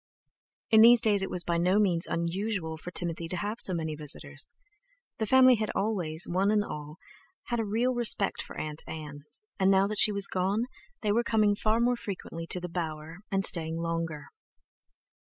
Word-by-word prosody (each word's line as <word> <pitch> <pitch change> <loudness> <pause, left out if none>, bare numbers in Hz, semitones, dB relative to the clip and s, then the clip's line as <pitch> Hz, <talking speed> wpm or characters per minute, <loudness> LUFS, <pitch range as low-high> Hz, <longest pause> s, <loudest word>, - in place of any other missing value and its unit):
In 220 -1 +7
these 235 +1 +8
days 210 -3 +2
it 195 - -3
was 180 - +1
by 170 -1 -1
no 180 +3 +2
means 180 -5 +1
unusual 170 0 -2
for 160 +3 -9
Timothy 170 -1 -4
to 180 - -5
have 210 +6 -4
so - - +5
many 160 -2 -3
visitors. 145 -1 -2 0.7
The 220 - -1
family 255 0 +6
had 215 0 -2
always, 175 -7 +1
one 190 +3 +1
and 210 -1 +2
all, 150 -3 -8 0.5
had 240 -1 -1
a - - 0
real 230 +5 0
respect 235 -4 +1
for - - -10
Aunt 155 0 -3
Ann, 150 -2 -8 0.3
and 190 0 +3
now 195 0 +4
that 210 +1 -2
she 215 - +6
was 200 -1 +2
gone, 195 +5 0 0.4
they 210 - +1
were 235 +3 +2
coming 215 -3 +2
far 215 +2 0
more 245 +1 +2
frequently 180 -6 -7
to 180 - -2
The 180 - -5
Bower, 165 -1 -6
and 195 0 +1
staying 165 -2 0
longer. 165 -2 -4
190 Hz, 190 wpm, -28 LUFS, 165-215 Hz, 0.7 s, these